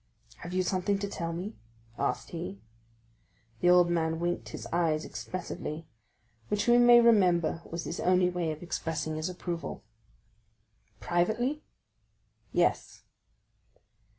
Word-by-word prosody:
"Have 175 Hz, -, -8 dB
you 185 Hz, 0 st, +1 dB
something 185 Hz, +2 st, 0 dB
to 200 Hz, +1 st, -3 dB
tell 170 Hz, -4 st, -4 dB
me?" 185 Hz, +6 st, -5 dB, 0.4 s
asked -, -, -2 dB
he. 95 Hz, +2 st, -5 dB, 1.0 s
The 175 Hz, -, +3 dB
old 180 Hz, -1 st, +6 dB
man 160 Hz, -1 st, 0 dB
winked 175 Hz, +1 st, -2 dB
his -, -, -7 dB
eyes 165 Hz, -3 st, +1 dB
expressively, 170 Hz, -3 st, -5 dB, 0.6 s
which 210 Hz, +2 st, -1 dB
we 240 Hz, 0 st, +6 dB
may 240 Hz, 0 st, +8 dB
remember 180 Hz, -8 st, +4 dB
was 170 Hz, 0 st, -5 dB
his 165 Hz, -, -5 dB
only 180 Hz, 0 st, +3 dB
way 175 Hz, -3 st, -1 dB
of 155 Hz, +2 st, -7 dB
expressing 155 Hz, -2 st, -3 dB
his 155 Hz, +3 st, -2 dB
approval. 175 Hz, -2 st, -5 dB, 1.2 s
"Privately?" 225 Hz, +12 st, 0 dB, 0.9 s
"Yes." -, -, 0 dB
175 Hz, 125 wpm, -29 LUFS, 165-195 Hz, 1.2 s, may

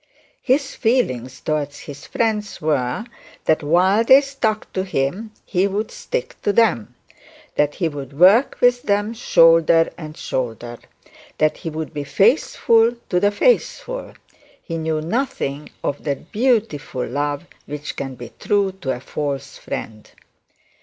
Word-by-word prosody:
His 270 Hz, +1 st, +1 dB
feelings 130 Hz, -, 0 dB
towards 145 Hz, -2 st, -2 dB
his 145 Hz, 0 st, -10 dB
friends 215 Hz, -3 st, -1 dB
were, 145 Hz, -, -1 dB, 0.4 s
that 160 Hz, -, +3 dB
while 185 Hz, +8 st, +3 dB
they 265 Hz, +4 st, +7 dB
stuck 260 Hz, -6 st, -2 dB
to 185 Hz, -, -1 dB
him 185 Hz, +5 st, -2 dB, 0.2 s
he 185 Hz, +1 st, +1 dB
would 205 Hz, +2 st, -3 dB
stick -, -, -4 dB
to 205 Hz, -, +1 dB
them; 200 Hz, -, +2 dB, 0.6 s
that 150 Hz, 0 st, +1 dB
he 170 Hz, -, 0 dB
would 140 Hz, -2 st, -7 dB
work 200 Hz, -, +5 dB
with 245 Hz, 0 st, +4 dB
them 205 Hz, +1 st, 0 dB
shoulder 165 Hz, -6 st, +4 dB
to 155 Hz, -2 st, -8 dB
shoulder; 120 Hz, -1 st, -4 dB, 0.6 s
that 155 Hz, 0 st, +2 dB
he 165 Hz, -, -5 dB
would 160 Hz, 0 st, -5 dB
be 145 Hz, -1 st, -3 dB
faithful 225 Hz, -, +3 dB
to 180 Hz, -, +2 dB
the 205 Hz, +2 st, +3 dB
faithful. -, -, 0 dB, 0.5 s
He 165 Hz, -2 st, -4 dB
knew 160 Hz, -1 st, -1 dB
nothing 160 Hz, -, -2 dB
of 145 Hz, -, -3 dB
that 145 Hz, +2 st, -4 dB
beautiful 210 Hz, -, 0 dB
love 145 Hz, +4 st, -2 dB, 0.2 s
which 150 Hz, +1 st, -6 dB
can 135 Hz, -1 st, -5 dB
be 120 Hz, -2 st, -10 dB
true 200 Hz, -2 st, +1 dB
to 130 Hz, -2 st, -1 dB
a -, -, -8 dB
false 140 Hz, +1 st, -4 dB
friend. 110 Hz, -1 st, -7 dB
165 Hz, 140 wpm, -21 LUFS, 145-220 Hz, 0.6 s, they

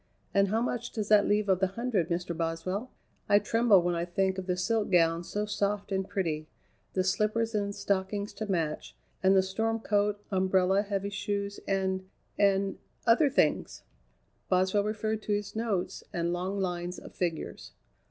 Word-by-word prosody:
"And 200 Hz, 0 st, +4 dB
how 220 Hz, +4 st, +1 dB
much 245 Hz, -1 st, -2 dB
does 215 Hz, -2 st, -3 dB
that 210 Hz, -1 st, +6 dB
leave 210 Hz, 0 st, +2 dB
of 190 Hz, -2 st, +3 dB
the 190 Hz, -, +3 dB
hundred, 230 Hz, -9 st, 0 dB
Mr. 175 Hz, 0 st, -2 dB
Boswell? 170 Hz, +8 st, -2 dB, 0.4 s
I 205 Hz, -, +7 dB
tremble 210 Hz, -2 st, +4 dB
when 175 Hz, 0 st, +1 dB
I 170 Hz, 0 st, -1 dB
think 190 Hz, +2 st, 0 dB
of 185 Hz, -, -7 dB
the 180 Hz, -1 st, 0 dB
silk 215 Hz, +4 st, 0 dB
gown 165 Hz, -2 st, +3 dB
so 210 Hz, +4 st, -2 dB
soft 205 Hz, 0 st, -1 dB
and 190 Hz, 0 st, -1 dB
pretty, 155 Hz, -5 st, -2 dB, 0.5 s
the 185 Hz, -, +1 dB
slippers 215 Hz, +4 st, +1 dB
and 200 Hz, -1 st, -1 dB
stockings 200 Hz, +1 st, -1 dB
to 215 Hz, -, -5 dB
match, 160 Hz, -4 st, -2 dB, 0.3 s
and 190 Hz, 0 st, +5 dB
the 190 Hz, -, +5 dB
storm 225 Hz, +4 st, -1 dB
coat, 205 Hz, -1 st, +1 dB
umbrella, 190 Hz, 0 st, +3 dB
heavy 200 Hz, -1 st, -3 dB
shoes, 200 Hz, 0 st, -3 dB
and 190 Hz, -1 st, -1 dB, 0.3 s
and 195 Hz, -1 st, +2 dB, 0.3 s
other 260 Hz, +6 st, +5 dB
things." 275 Hz, -, +1 dB, 0.7 s
Boswell 190 Hz, +2 st, +3 dB
referred 215 Hz, 0 st, -2 dB
to 210 Hz, -, -1 dB
his 205 Hz, +1 st, -3 dB
notes 220 Hz, -5 st, -2 dB
and 170 Hz, 0 st, -1 dB
long 185 Hz, +3 st, -2 dB
lines 180 Hz, -1 st, -2 dB
of -, -, -11 dB
figures. 170 Hz, -3 st, -4 dB
195 Hz, 170 wpm, -29 LUFS, 185-210 Hz, 0.7 s, I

